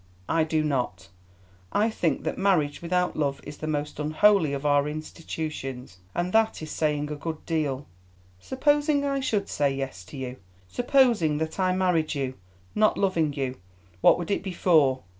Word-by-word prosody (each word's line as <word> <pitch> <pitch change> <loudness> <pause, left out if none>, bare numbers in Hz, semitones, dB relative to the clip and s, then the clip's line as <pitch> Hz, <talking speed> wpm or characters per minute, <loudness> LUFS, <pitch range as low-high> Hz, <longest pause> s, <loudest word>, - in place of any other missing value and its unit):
"I 165 0 +2
do 155 0 0
not. 125 - -2 0.6
I 220 +2 +2
think 170 -6 -1
that - - -2
marriage 170 -7 +2
without 180 +1 0
love 140 -2 -1
is 145 - -9
the 155 - -5
most 150 -1 -3
unholy 155 +2 +3
of 140 +1 -4
our 145 0 +3
institutions, 150 - -6 0.2
and 175 +1 -1
that 225 0 +3
is 155 - -6
saying 150 -1 -1
a - - -2
good 160 +1 -6
deal. 145 -4 -1 0.5
Supposing 290 - +1
I 275 -1 0
should 215 -7 -1
say 145 -1 +1
yes 135 -9 -5
to 140 - -10
you, 130 -1 -5 0.3
supposing 240 - +3
that 160 +4 -3
I 185 -1 +3
married 175 -5 +1
you, 135 -2 -2 0.4
not 215 0 +3
loving 170 -6 +1
you, 135 -2 -3 0.4
what - - +6
would 175 +2 -4
it - - +1
be 190 -1 -5
for? 150 -8 +3
155 Hz, 170 wpm, -26 LUFS, 145-190 Hz, 0.6 s, what